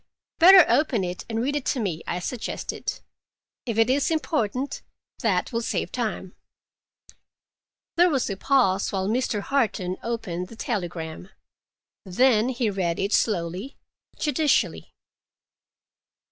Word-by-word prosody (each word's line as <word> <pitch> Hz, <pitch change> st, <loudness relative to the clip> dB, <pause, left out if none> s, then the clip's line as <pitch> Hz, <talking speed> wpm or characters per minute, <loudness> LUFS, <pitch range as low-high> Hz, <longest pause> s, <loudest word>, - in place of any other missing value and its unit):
"Better 370 Hz, +2 st, +9 dB
open 260 Hz, -9 st, +2 dB
it 180 Hz, 0 st, -5 dB
and 225 Hz, 0 st, -2 dB
read 285 Hz, +3 st, -1 dB
it 290 Hz, -, -2 dB
to 265 Hz, -, 0 dB
me," 180 Hz, -8 st, -2 dB
I 175 Hz, -, -2 dB
suggested. 215 Hz, +6 st, -4 dB, 0.7 s
"If 230 Hz, -2 st, -2 dB
it 225 Hz, 0 st, +4 dB
is 270 Hz, +2 st, +2 dB
important, 280 Hz, -5 st, -1 dB, 0.4 s
that 200 Hz, -1 st, 0 dB
will 230 Hz, -, 0 dB
save -, -, -2 dB
time." 215 Hz, -6 st, -3 dB, 1.6 s
There 350 Hz, +1 st, +6 dB
was 270 Hz, -6 st, 0 dB
a 195 Hz, -, -3 dB
pause 195 Hz, -4 st, +2 dB
while 190 Hz, -1 st, -1 dB
Mr. 230 Hz, -1 st, 0 dB
Harton 205 Hz, -8 st, -1 dB
opened 195 Hz, -7 st, -4 dB
the 225 Hz, -, -12 dB
telegram. 175 Hz, -6 st, -4 dB, 0.7 s
Then 225 Hz, +4 st, +3 dB
he 240 Hz, -4 st, -1 dB
read 175 Hz, -4 st, -1 dB
it 200 Hz, +2 st, -1 dB
slowly, 190 Hz, +4 st, -1 dB, 0.4 s
judicially. 295 Hz, 0 st, 0 dB
225 Hz, 125 wpm, -25 LUFS, 185-260 Hz, 1.6 s, Better